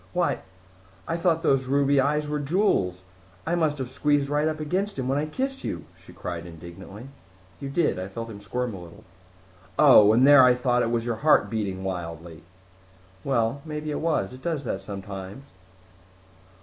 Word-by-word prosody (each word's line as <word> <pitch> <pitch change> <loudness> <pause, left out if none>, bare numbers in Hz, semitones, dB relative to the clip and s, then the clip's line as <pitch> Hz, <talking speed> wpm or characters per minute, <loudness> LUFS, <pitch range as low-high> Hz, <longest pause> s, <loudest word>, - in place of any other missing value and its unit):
"Why, 180 -1 +1 0.7
I 165 - -1
thought 165 -1 +1
those 135 -1 +2
ruby 140 +1 +3
eyes 150 +2 0
were 150 0 -2
jewels! 140 - +1 0.4
I 165 - -1
must 160 -4 +1
have 130 -2 -5
squeezed 145 +1 +1
right 150 +1 +2
up 155 -1 -2
against 185 +6 -2
him 130 -2 -2
when 135 +2 +1
I 150 - -2
kissed 270 - -3
you," - - -4 0.2
she - - -14
cried 85 -1 -6
indignantly. 90 +8 -11 0.5
"You 140 - -5
did. 150 - +1
I 95 - -4
felt 115 +4 -7
him 100 - -9
squirm 125 +4 -3
a 95 - -8
little." 85 +5 -13 0.7
"Oh! 105 0 +8
And 125 +5 +5
here 145 -1 +9
I 125 -1 +6
thought 125 -1 +1
it 115 - 0
was 115 -1 -1
your 120 -2 -2
heart 150 -2 +3
beating 100 -4 -3
wildly." 85 -3 -6 0.8
"Well, 120 0 0
maybe 150 -1 -5
it - - -2
was. 155 -10 -1
It 130 - -11
does 160 -2 -2
that 100 -6 -3
sometimes." 95 +3 -8
130 Hz, 180 wpm, -25 LUFS, 100-150 Hz, 0.8 s, here